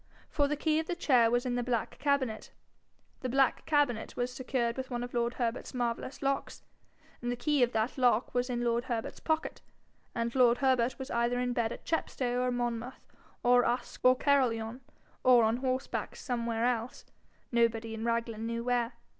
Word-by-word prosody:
For 285 Hz, -2 st, +2 dB
the 300 Hz, +1 st, -1 dB
key 310 Hz, +1 st, +1 dB
of 320 Hz, -, -3 dB
the 355 Hz, -, -2 dB
chair 250 Hz, -9 st, +4 dB
was 245 Hz, +2 st, +1 dB
in 250 Hz, -, -1 dB
the 245 Hz, -, 0 dB
black 240 Hz, -1 st, -2 dB
cabinet; 280 Hz, -5 st, 0 dB, 0.7 s
the 255 Hz, -, -3 dB
black 270 Hz, +1 st, +2 dB
cabinet 290 Hz, -7 st, +1 dB
was 245 Hz, +1 st, -1 dB
secured 250 Hz, -2 st, -1 dB
with 260 Hz, 0 st, -5 dB
one 245 Hz, -1 st, -3 dB
of 245 Hz, -, -7 dB
lord 240 Hz, 0 st, 0 dB
Herbert's 240 Hz, +1 st, -3 dB
marvellous 240 Hz, +3 st, -3 dB
locks; 275 Hz, 0 st, -2 dB, 0.6 s
the 245 Hz, 0 st, -1 dB
key 285 Hz, +3 st, +1 dB
of 245 Hz, -1 st, +4 dB
that 220 Hz, +4 st, -1 dB
lock 245 Hz, -2 st, +2 dB
was 245 Hz, +1 st, 0 dB
in 240 Hz, -1 st, -1 dB
lord 235 Hz, +1 st, +1 dB
Herbert's 235 Hz, -3 st, -3 dB
pocket, 315 Hz, -1 st, -2 dB, 0.5 s
and 235 Hz, 0 st, -1 dB
lord 245 Hz, -2 st, +5 dB
Herbert 260 Hz, -2 st, +2 dB
was 265 Hz, 0 st, -7 dB
either 235 Hz, +1 st, +1 dB
in 250 Hz, 0 st, 0 dB
bed 230 Hz, -2 st, 0 dB
at -, -, -8 dB
Chepstow 250 Hz, -6 st, -1 dB
or 250 Hz, -, +1 dB
Monmouth 240 Hz, 0 st, -3 dB, 0.4 s
or 245 Hz, 0 st, +5 dB
Usk 245 Hz, +1 st, -2 dB
or 255 Hz, 0 st, +7 dB
Caerlyon, 250 Hz, -4 st, +1 dB, 0.4 s
or 250 Hz, -2 st, +6 dB
on 220 Hz, +2 st, +2 dB
horseback 255 Hz, 0 st, -2 dB
somewhere 235 Hz, -2 st, -2 dB
else, 245 Hz, 0 st, -2 dB, 0.5 s
nobody 230 Hz, -1 st, +1 dB
in 225 Hz, 0 st, -5 dB
Raglan 230 Hz, -1 st, -1 dB
knew 230 Hz, 0 st, -3 dB
where. 240 Hz, -1 st, 0 dB
245 Hz, 180 wpm, -31 LUFS, 235-260 Hz, 0.7 s, or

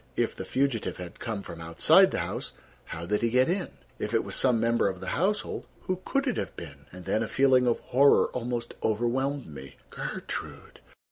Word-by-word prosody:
If -, -, 0 dB
the -, -, -6 dB
fugitive 125 Hz, -9 st, -1 dB
had 90 Hz, -1 st, -9 dB
come 110 Hz, -5 st, -4 dB
from 85 Hz, -, -9 dB
outside 85 Hz, 0 st, +5 dB
the -, -, -3 dB
house, -, -, -5 dB, 0.3 s
how 85 Hz, +1 st, -6 dB
did 105 Hz, +3 st, 0 dB
he 115 Hz, -, +2 dB
get 125 Hz, +2 st, +3 dB
in? 180 Hz, 0 st, 0 dB, 0.3 s
If -, -, -2 dB
it -, -, +3 dB
was -, -, -3 dB
some 125 Hz, -3 st, +3 dB
member 115 Hz, -1 st, +2 dB
of 95 Hz, -2 st, -3 dB
the 95 Hz, -, -5 dB
household, 200 Hz, +6 st, -1 dB, 0.2 s
who 185 Hz, -1 st, -2 dB
could 275 Hz, 0 st, 0 dB
it 250 Hz, -, 0 dB
have -, -, -4 dB
been? 70 Hz, -4 st, -10 dB
And 90 Hz, 0 st, -11 dB
then—a 110 Hz, +1 st, 0 dB
feeling 130 Hz, -1 st, +4 dB
of 120 Hz, -, +3 dB
horror 140 Hz, +3 st, +4 dB
almost 120 Hz, -1 st, -4 dB
overwhelmed 125 Hz, +5 st, 0 dB
me. 70 Hz, -3 st, -10 dB, 0.2 s
Gertrude! -, -, -6 dB
115 Hz, 195 wpm, -28 LUFS, 95-135 Hz, 0.3 s, outside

